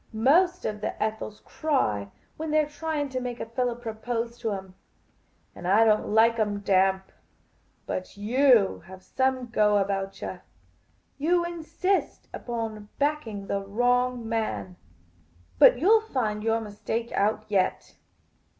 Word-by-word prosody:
Most 345 Hz, +11 st, +3 dB
of 210 Hz, -1 st, -3 dB
the -, -, -4 dB
Ethels 215 Hz, -1 st, -3 dB
cry 105 Hz, -, -1 dB, 0.3 s
when 315 Hz, 0 st, -5 dB
they 310 Hz, +1 st, +3 dB
're 305 Hz, -, +1 dB
trying 295 Hz, -1 st, -3 dB
to 260 Hz, -1 st, -3 dB
make 245 Hz, -1 st, -5 dB
a -, -, -3 dB
fellah 240 Hz, +1 st, -1 dB
propose 235 Hz, 0 st, -4 dB
to 225 Hz, -2 st, -2 dB
'em; 190 Hz, -2 st, -6 dB, 0.8 s
and 175 Hz, -, -7 dB
I 210 Hz, +4 st, +5 dB
don't 215 Hz, -1 st, +3 dB
like 225 Hz, +2 st, +4 dB
'em 205 Hz, -2 st, 0 dB
damp; 190 Hz, -1 st, +2 dB, 0.7 s
but 185 Hz, +2 st, -5 dB
you 235 Hz, 0 st, +3 dB
have 190 Hz, 0 st, -12 dB
some 260 Hz, +2 st, 0 dB
go 210 Hz, -2 st, +3 dB
about 195 Hz, -1 st, -2 dB
yah. -, -, -6 dB, 0.8 s
You 345 Hz, +4 st, +2 dB
insist 345 Hz, +3 st, -2 dB
upon 225 Hz, -3 st, -5 dB
backing 280 Hz, -9 st, -1 dB
the 200 Hz, 0 st, -2 dB
wrong 245 Hz, +3 st, 0 dB
man. 220 Hz, -5 st, -2 dB, 0.8 s
But -, -, +8 dB
you 320 Hz, +9 st, 0 dB
'11 445 Hz, 0 st, -7 dB
find 215 Hz, -5 st, -1 dB
your 225 Hz, 0 st, +1 dB
mistake 220 Hz, +2 st, -4 dB
out 215 Hz, +2 st, +1 dB
yet." 195 Hz, -3 st, 0 dB
225 Hz, 140 wpm, -26 LUFS, 205-260 Hz, 0.8 s, But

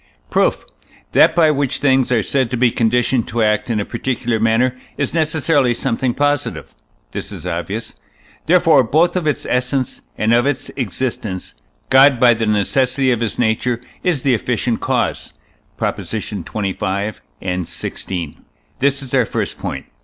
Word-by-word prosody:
Proof. -, -, +1 dB, 0.5 s
That -, -, +5 dB
by 160 Hz, -3 st, +5 dB
which 140 Hz, -2 st, 0 dB
things 130 Hz, -2 st, +2 dB
are 115 Hz, -4 st, +2 dB
said 130 Hz, 0 st, 0 dB
to 125 Hz, -, -2 dB
be 120 Hz, 0 st, +3 dB
conditioned 120 Hz, +1 st, +1 dB
to 115 Hz, 0 st, 0 dB
act 105 Hz, +3 st, +1 dB
in 110 Hz, -2 st, 0 dB
a 100 Hz, -, -2 dB
particular 120 Hz, -1 st, -2 dB
manner 115 Hz, +3 st, +2 dB, 0.2 s
is 140 Hz, -, -1 dB
necessarily 155 Hz, -5 st, +2 dB
something 120 Hz, +2 st, -1 dB
positive 145 Hz, 0 st, -1 dB, 0.4 s
(this -, -, -6 dB
is -, -, -9 dB
obvious); 90 Hz, +6 st, -4 dB, 0.5 s
therefore 165 Hz, -5 st, +5 dB
both 160 Hz, +10 st, +2 dB
of 175 Hz, -4 st, -1 dB
its 150 Hz, -, -1 dB
essence 125 Hz, +1 st, -1 dB, 0.2 s
and 110 Hz, +2 st, +2 dB
of 120 Hz, +3 st, +3 dB
its 145 Hz, -2 st, -2 dB
existence 115 Hz, -5 st, -3 dB, 0.4 s
God 135 Hz, -1 st, +6 dB
by 120 Hz, -1 st, +6 dB
the 115 Hz, -1 st, -2 dB
necessity 130 Hz, +5 st, +2 dB
of 120 Hz, -, +1 dB
his 115 Hz, -2 st, -2 dB
nature 115 Hz, +1 st, +1 dB, 0.2 s
is 170 Hz, -8 st, 0 dB
the 135 Hz, -, +3 dB
efficient 120 Hz, +1 st, 0 dB
cause -, -, -1 dB, 0.4 s
(Props. -, -, -3 dB
xxv. 100 Hz, 0 st, -3 dB, 0.2 s
and 90 Hz, -2 st, -2 dB
xvi.); 85 Hz, -5 st, -5 dB, 0.4 s
this 140 Hz, +1 st, +1 dB
is 130 Hz, -, -10 dB
our 130 Hz, -3 st, +4 dB
first -, -, -3 dB
point. -, -, -5 dB
125 Hz, 155 wpm, -18 LUFS, 110-135 Hz, 0.5 s, God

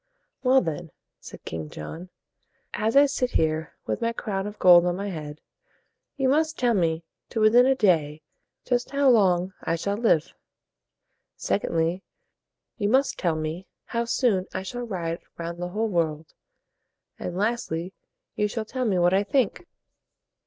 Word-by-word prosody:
"Well, 260 Hz, +1 st, +4 dB
then," 165 Hz, -1 st, -4 dB, 0.3 s
said -, -, -12 dB
King 80 Hz, -2 st, -5 dB
John, 160 Hz, -, -8 dB, 0.6 s
"as 220 Hz, +2 st, -1 dB
I 285 Hz, -, +8 dB
sit 270 Hz, -3 st, -1 dB
here 160 Hz, 0 st, 0 dB
with -, -, -3 dB
my 230 Hz, 0 st, 0 dB
crown 200 Hz, -4 st, -3 dB
of 210 Hz, -, -8 dB
gold 175 Hz, -2 st, +7 dB
on 175 Hz, -, 0 dB
my 200 Hz, +2 st, -4 dB
head, 155 Hz, -4 st, -7 dB, 0.8 s
you 270 Hz, -1 st, +1 dB
must 315 Hz, +4 st, +2 dB
tell 245 Hz, -2 st, +2 dB
me 165 Hz, -4 st, 0 dB, 0.3 s
to 225 Hz, -, -3 dB
within 235 Hz, +4 st, +6 dB
a 270 Hz, -, +4 dB
day 155 Hz, -, +1 dB, 0.4 s
just 245 Hz, -1 st, 0 dB
how 280 Hz, -1 st, +3 dB
long 185 Hz, -4 st, +3 dB
I 165 Hz, -, 0 dB
shall 200 Hz, +5 st, -2 dB
live. 215 Hz, -9 st, +2 dB, 1.0 s
Sec -, -, -1 dB
ond -, -, -2 dB
ly, 165 Hz, +3 st, 0 dB, 0.8 s
you 205 Hz, -1 st, +1 dB
must 265 Hz, +4 st, +2 dB
tell 170 Hz, -4 st, +1 dB
me 155 Hz, +4 st, -4 dB, 0.2 s
how 235 Hz, 0 st, -2 dB
soon 225 Hz, -6 st, +1 dB
I -, -, -2 dB
shall 240 Hz, +5 st, -5 dB
ride 170 Hz, -5 st, -3 dB, 0.2 s
round 170 Hz, 0 st, -5 dB
the 175 Hz, -, -3 dB
whole 215 Hz, +5 st, -1 dB
world; 160 Hz, -5 st, -2 dB, 0.9 s
and 180 Hz, -, -5 dB
lastly, 190 Hz, -5 st, -2 dB, 0.4 s
you 210 Hz, -, +1 dB
shall 220 Hz, +1 st, -4 dB
tell 255 Hz, +3 st, -3 dB
me 200 Hz, -5 st, +1 dB
what 175 Hz, +1 st, +3 dB
I 195 Hz, +1 st, +3 dB
think." 260 Hz, -, 0 dB
195 Hz, 165 wpm, -25 LUFS, 170-235 Hz, 1.0 s, I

